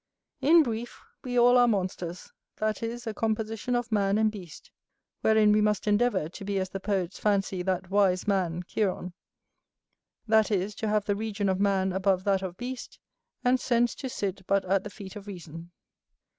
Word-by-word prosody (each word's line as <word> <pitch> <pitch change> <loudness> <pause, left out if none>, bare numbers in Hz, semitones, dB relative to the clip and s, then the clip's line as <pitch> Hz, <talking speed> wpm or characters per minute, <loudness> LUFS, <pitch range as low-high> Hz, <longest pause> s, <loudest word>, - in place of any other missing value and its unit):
In 325 +2 +6
brief, 235 -2 -5 0.2
we 245 -1 -2
all 245 +1 +6
are 245 - +5
monsters; 185 -4 -2 0.2
that 215 0 -2
is, 235 +2 -4
a 220 - -3
composition 220 +2 -2
of 240 -1 -2
man 200 -1 +2
and 220 0 +3
beast: 180 -8 -11 0.5
wherein 220 -1 +4
we 210 0 +4
must 210 0 +1
endeavour 205 -5 +2
to 185 +5 -10
be 200 0 -2
as 185 -1 -1
the 195 - -5
poets 190 -2 -2
fancy 195 -3 0
that 185 0 -2
wise 195 -2 +2
man, 180 -4 0
Chiron; 185 -3 -2 1.1
that 220 -1 +4
is, 200 0 0
to 220 - -2
have 210 -1 +1
the 205 - 0
region 205 -1 -2
of 190 0 0
man 190 -2 +1
above 190 -1 +1
that 195 -1 +2
of 180 -2 -5
beast, 250 +1 -6 0.5
and 250 +1 +3
sense 240 -1 +2
to 265 - -6
sit 195 -6 -3
but 200 -1 +2
at 190 +1 +1
the 210 - -6
feet 200 -2 -10
of 205 -1 -9
reason. 170 -3 -9
205 Hz, 185 wpm, -28 LUFS, 190-220 Hz, 1.1 s, In